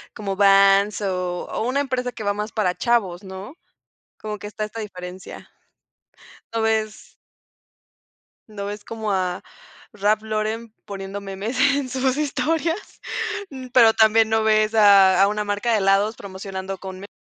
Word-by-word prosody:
como 200 Hz, -2 st, -4 dB
Vans 195 Hz, +1 st, +5 dB
o 180 Hz, -2 st, -2 dB
o 225 Hz, -, -3 dB
una 280 Hz, +2 st, +1 dB
empresa 255 Hz, -2 st, -2 dB
que 225 Hz, -, -8 dB
va 205 Hz, 0 st, +1 dB
más 210 Hz, +1 st, -4 dB
para 195 Hz, -5 st, 0 dB
chavos, 205 Hz, -7 st, 0 dB
¿no? 190 Hz, +7 st, -9 dB, 0.6 s
Como 210 Hz, -1 st, -6 dB
que 205 Hz, -, -7 dB
está 215 Hz, +1 st, -5 dB
esta 215 Hz, +2 st, -6 dB
diferencia. 185 Hz, -3 st, -8 dB, 1.1 s
No 225 Hz, -, 0 dB
ves 220 Hz, -1 st, -1 dB, 1.3 s
no 200 Hz, -2 st, -6 dB
ves 205 Hz, 0 st, -6 dB
como 220 Hz, -2 st, -4 dB
a 185 Hz, -1 st, -1 dB, 0.5 s
Raph 210 Hz, +1 st, +1 dB
Lauren 220 Hz, +1 st, -3 dB
poniendo 195 Hz, 0 st, -6 dB
memes 200 Hz, +5 st, -5 dB
en 280 Hz, -1 st, +3 dB
sus 260 Hz, +1 st, 0 dB
historias, 325 Hz, +4 st, -2 dB, 0.5 s
mm, 260 Hz, -2 st, -8 dB
pero 235 Hz, -3 st, +6 dB
también 220 Hz, 0 st, +4 dB
no 220 Hz, 0 st, +2 dB
ves 215 Hz, 0 st, +2 dB
a 200 Hz, -3 st, +6 dB
a 195 Hz, -, +6 dB
una 210 Hz, +1 st, -1 dB
marca 205 Hz, +3 st, -1 dB
de 225 Hz, -, +3 dB
helados 200 Hz, +3 st, +2 dB
promocionando 190 Hz, 0 st, -6 dB
con 190 Hz, 0 st, -8 dB
me 200 Hz, -, -9 dB
210 Hz, 155 wpm, -22 LUFS, 195-225 Hz, 1.3 s, pero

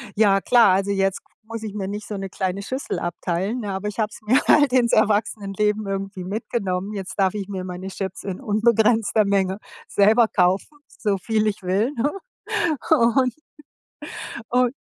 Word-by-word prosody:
ja, 205 Hz, -2 st, +4 dB
klar, 240 Hz, -2 st, +5 dB
also, 195 Hz, +2 st, +1 dB
jetzt 195 Hz, -1 st, 0 dB, 0.2 s
muss 225 Hz, 0 st, -7 dB
ich 215 Hz, -2 st, -5 dB
mir 195 Hz, -2 st, -4 dB
nicht 210 Hz, +1 st, -6 dB
so 210 Hz, -, -5 dB
'ne 195 Hz, 0 st, -5 dB
kleine 190 Hz, +1 st, -2 dB
Schüssel 260 Hz, +7 st, -4 dB
abteilen, 180 Hz, +7 st, -2 dB
ne, 205 Hz, -, -4 dB
aber 190 Hz, +2 st, -3 dB
ich 210 Hz, -, -9 dB
habe 215 Hz, -, +1 dB
es -, -, -12 dB
mir 240 Hz, +6 st, +4 dB
halt 285 Hz, -4 st, +5 dB
ins 245 Hz, -2 st, +3 dB
Erwachsenenleben 210 Hz, 0 st, +1 dB
irgendwie 195 Hz, -1 st, -4 dB
mitgenommen. 200 Hz, -1 st, -3 dB
Jetzt 195 Hz, -2 st, -6 dB
darf 190 Hz, -1 st, +3 dB
ich 200 Hz, -2 st, -4 dB
mir 190 Hz, -2 st, -4 dB
meine 185 Hz, +1 st, -6 dB
Chips 195 Hz, 0 st, -5 dB
in 190 Hz, -2 st, -5 dB
unbegrenzter 220 Hz, 0 st, +3 dB
Menge 195 Hz, -1 st, +1 dB, 0.3 s
selber 220 Hz, +3 st, +4 dB
kaufen, 190 Hz, +9 st, +1 dB, 0.2 s
so 205 Hz, -3 st, 0 dB
viel 215 Hz, +3 st, 0 dB
ich 200 Hz, -2 st, -3 dB
will, 200 Hz, +9 st, 0 dB
ne? 285 Hz, +6 st, +1 dB, 0.8 s
Und 250 Hz, +2 st, +3 dB, 1.2 s
und 250 Hz, 0 st, +2 dB
205 Hz, 170 wpm, -22 LUFS, 195-225 Hz, 1.2 s, klar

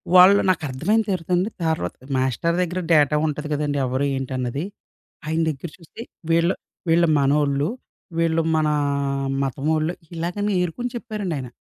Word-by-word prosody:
వాళ్ళు 185 Hz, +2 st, +8 dB
నాకు 170 Hz, -3 st, +1 dB
అర్థమైన 180 Hz, +13 st, +1 dB
తర్వాతండి. 180 Hz, +2 st, 0 dB, 0.2 s
తర్వాత, 160 Hz, -, -1 dB, 0.2 s
మాస్టర్ 130 Hz, +6 st, 0 dB
దెగ్గర 180 Hz, +1 st, -1 dB
డేటా 150 Hz, -1 st, +4 dB
ఉంటది 150 Hz, 0 st, -4 dB
గదండీ! 145 Hz, -1 st, -1 dB
ఎవరు 130 Hz, +3 st, 0 dB
ఏంటన్నది. 130 Hz, +2 st, -3 dB, 0.6 s
ఆయన 160 Hz, +1 st, 0 dB
దగ్గర 150 Hz, +3 st, -5 dB
చూస్తే, 170 Hz, +5 st, -12 dB, 0.3 s
వీళ్ళు 170 Hz, +2 st, +3 dB, 0.3 s
వీళ్ళు 170 Hz, +1 st, +4 dB
మనోళ్ళు. 140 Hz, +1 st, +2 dB, 0.5 s
వీళ్ళు 165 Hz, 0 st, +2 dB
మన 155 Hz, -1 st, +2 dB, 0.8 s
మతం 135 Hz, +1 st, -3 dB
వోళ్ళు. 155 Hz, +2 st, 0 dB, 0.2 s
ఇలాగని 180 Hz, +5 st, -2 dB
ఏరుకొని 240 Hz, +8 st, -2 dB
చెప్పారండి 215 Hz, -7 st, -4 dB
ఆయన. 130 Hz, -2 st, -5 dB
160 Hz, 135 wpm, -23 LUFS, 140-180 Hz, 0.8 s, వాళ్ళు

